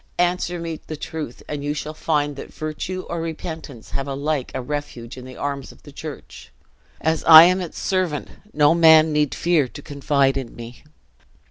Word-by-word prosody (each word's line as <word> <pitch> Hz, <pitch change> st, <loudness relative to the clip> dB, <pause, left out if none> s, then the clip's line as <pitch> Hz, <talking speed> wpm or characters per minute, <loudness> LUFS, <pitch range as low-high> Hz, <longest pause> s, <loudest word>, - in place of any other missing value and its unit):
Answer 175 Hz, 0 st, 0 dB
me 165 Hz, -2 st, -5 dB
the 155 Hz, -, -5 dB
truth 155 Hz, -5 st, -6 dB
and 145 Hz, -1 st, -5 dB
you 145 Hz, +1 st, -2 dB
shall 155 Hz, +1 st, -5 dB
find 150 Hz, -2 st, -1 dB
that -, -, -9 dB
virtue 155 Hz, +4 st, -5 dB
or 170 Hz, -1 st, -3 dB
repentance 160 Hz, -6 st, -7 dB
have 135 Hz, 0 st, -3 dB
alike 140 Hz, 0 st, -2 dB
a -, -, -1 dB
refuge 130 Hz, -3 st, -5 dB
in 130 Hz, -1 st, -10 dB
the 130 Hz, 0 st, -11 dB
arms 140 Hz, -2 st, -4 dB
of -, -, -20 dB
the -, -, -12 dB
church. -, -, -10 dB, 0.5 s
As 160 Hz, 0 st, 0 dB
I 160 Hz, 0 st, +11 dB
am 185 Hz, +2 st, +3 dB
its 175 Hz, -, -7 dB
servant, 185 Hz, -6 st, -1 dB, 0.2 s
no 150 Hz, +1 st, +4 dB
man 160 Hz, -2 st, +6 dB
need 150 Hz, -1 st, +1 dB
fear 170 Hz, -6 st, +2 dB
to -, -, -11 dB
confide 140 Hz, -1 st, +1 dB
in 130 Hz, -4 st, -5 dB
me. 120 Hz, +1 st, -10 dB
150 Hz, 180 wpm, -22 LUFS, 140-165 Hz, 0.5 s, I